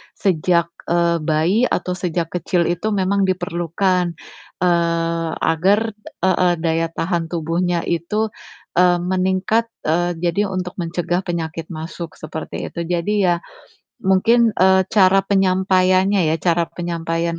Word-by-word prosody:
sejak, 170 -2 +1 0.2
eee, 170 0 +2
bayi 170 +9 +2
atau 180 - -2
sejak 170 -2 -2
kecil 175 0 +1
itu 175 +5 -2
memang 195 +1 +1
diperlukan, 180 0 0 0.5
eee, 170 -1 +1
agar 190 +6 +3 0.4
heeh, 185 -1 +3
daya 165 0 +1
tahan 170 0 -1
tubuhnya 170 +1 0
itu, 210 +7 -1 0.5
eee, 180 -1 +5
meningkat, 185 +5 +1 0.2
eee, 175 +3 +1
jadi 175 +4 +1
untuk 180 -1 -4
mencegah 175 +1 -1
penyakit 165 -2 -4
masuk 160 +1 -7
seperti 155 0 -6
itu. 170 - -5
Jadi 175 +4 -1
ya 175 - +3 0.7
mungkin, 225 +5 +3
eee, 190 +1 +4
cara 195 -2 +5
penyampaiannya 190 0 +3
ya, - - +2
cara 170 0 +3
penyampaian 170 -1 -3
175 Hz, 120 wpm, -20 LUFS, 170-185 Hz, 0.7 s, eee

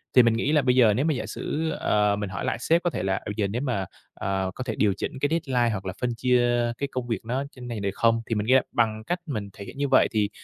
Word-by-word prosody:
Thì 125 - +9
mình 115 -1 +4
nghĩ 125 +6 0
là 150 -2 +4
bây 125 -1 +2
giờ 115 -5 +6
nếu 135 +8 0
mà 160 - +2
giả 125 - -3
sử, 160 +1 -3
ờ, 105 -6 +1
mình 105 -1 -4
hỏi 90 - -4
lại - - -1
sếp 170 +2 +2
có 175 - +2
thể - - -4
là 95 0 +1
"Ừ, 105 - -3
giờ 105 -3 0
nếu 115 +6 -3
mà, 120 -9 -1 0.3
ờ, 95 -1 -2
có 130 - -4
thể 110 -3 -3
điều 100 -3 +2
chỉnh 130 - -4
cái 145 - +2
deadline 130 -8 +1
hoặc 95 -2 -4
là 95 - -3
phân 120 -2 0
chia 120 -1 +2
cái 140 - -2
công 125 -1 -3
việc 115 -2 -3
nó 130 +4 -1
trên 125 -1 -10
này 115 -3 -4
được 100 0 -1
không?" 115 +1 +2
Thì 115 - -2
mình 105 +1 -1
ghe 130 0 +6
bằng 110 -2 0
cách 175 +9 -2
mình 105 -9 -4
thể 100 - -9
hiện - - -10
như 140 0 0
vậy 130 - +5
thì 105 -2 +1
120 Hz, 300 wpm, -25 LUFS, 105-130 Hz, 0.3 s, Thì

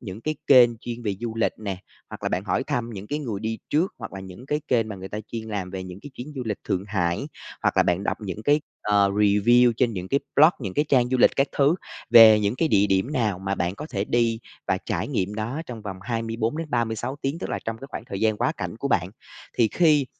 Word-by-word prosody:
những 105 -3 -8
cái 155 +5 -2
kênh 120 -4 +7
chuyên 120 0 -6
về 105 -3 -1
du 115 -2 -4
lịch 115 - +1
nè, 100 -4 -4 0.3
hoặc - - -9
là - - 0
bạn - - -2
hỏi - - 0
thăm 120 -1 -2
những 100 -2 -7
cái 150 - -2
người 115 -9 -4
đi 110 0 -3
trước, 165 +6 +1
hoặc 100 -5 -7
là 95 - -7
những 95 +6 -11
cái 150 +1 -1
kênh 115 -3 +2
mà 105 - -6
người 95 0 -8
ta 105 - -5
chuyên 115 -1 -4
làm 100 -4 -3
về 95 0 -5
những 95 +1 -9
cái 145 - -9
chuyến 130 +5 -8
du 130 - -2
lịch 105 -3 -3
Thượng 95 +1 -1
Hải, 90 -4 -1 0.4
hoặc - - +1
là - - +6
bạn 90 +3 0
đọc - - 0
những 105 0 -6
cái 145 +6 +3 0.2
ờ 100 -1 +3
review 105 +4 +4
trên 120 0 +2
những 90 -2 -5
cái 140 - +1 0.2
blog, 155 +4 +8
những 100 -6 -5
cái 150 - +2
trang 125 -3 +3
du 130 - +1
lịch - - +6
các 135 - +3
thứ, 145 +4 +4 0.4
về 110 -2 +9
những 105 +2 0
cái 160 - +1
địa 100 -3 +4
điểm 95 +8 +1
nào 110 -9 0
mà 95 +1 -2
bạn 90 0 -1
có 150 - -7
thể 100 0 -1
đi 115 0 +1 0.3
và - - +2
trải - - -2
nghiệm 95 +3 -1
đó 115 +9 -3
trong 115 -3 -8
vòng 100 -3 -6
24 115 +3 -2
đến 165 -2 -5
36 120 +2 -1
tiếng, 140 +4 -1
tức - - -5
là - - -1
trong 115 0 -3
cái 135 - -8
khoảng - - -6
thời 100 - -6
gian 110 -1 +2
quá - - +1
cảnh 90 0 -5
của 140 - -3
bạn. 90 -7 +1 0.5
Thì 115 -3 +5
khi 150 -4 +3
110 Hz, 265 wpm, -24 LUFS, 100-125 Hz, 0.5 s, về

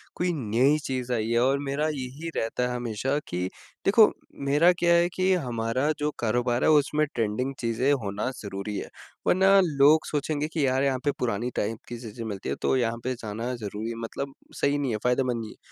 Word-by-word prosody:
कोई 180 0 0
नई 130 +2 +2
चीज़ 125 -2 -3
आई 110 -1 -1
है 120 - +3
और 135 +2 +3
मेरा 145 +2 -1
यही 140 +5 -5
रहता 125 +2 -1
है 125 - -3
हमेशा 120 +4 -1
कि 90 +1 -2 0.4
देखो 210 +2 +7 0.4
मेरा 160 +5 +6
क्या 170 0 +4
है 170 +1 +4
कि 185 0 +3
हमारा 125 -2 0
जो 150 0 0
कारोबार 120 +2 +1
है - - +4
उसमें 150 0 +3
ट्रेंडिंग 115 +4 -1
चीज़ें 120 +4 +1
होना 100 +5 -2
ज़रूरी 100 0 -5
है। - - -4 0.4
वरना 195 +2 +5
लोग 150 0 +4
सोचेंगे 150 0 -1
कि 155 -4 +1
यार 130 +1 +2
यहाँ 135 -2 +1
पे 145 - +3
पुरानी 120 0 -1
टाइप 110 +2 -1
की 120 - -6
चीज़ें 115 0 -7
मिलती 100 -3 -5
है - - -1
तो - - +2
यहाँ 115 -2 0
पे 130 - -1
जाना 115 +2 -4
ज़रूरी 110 +1 -5
मतलब 135 +4 -5 0.3
सही 140 +1 +2
नहीं 140 -4 -1
है, 110 - 0
फायदेमंद 125 -1 +1
नहीं 110 - -6
है। - - -16
125 Hz, 200 wpm, -26 LUFS, 115-145 Hz, 0.4 s, देखो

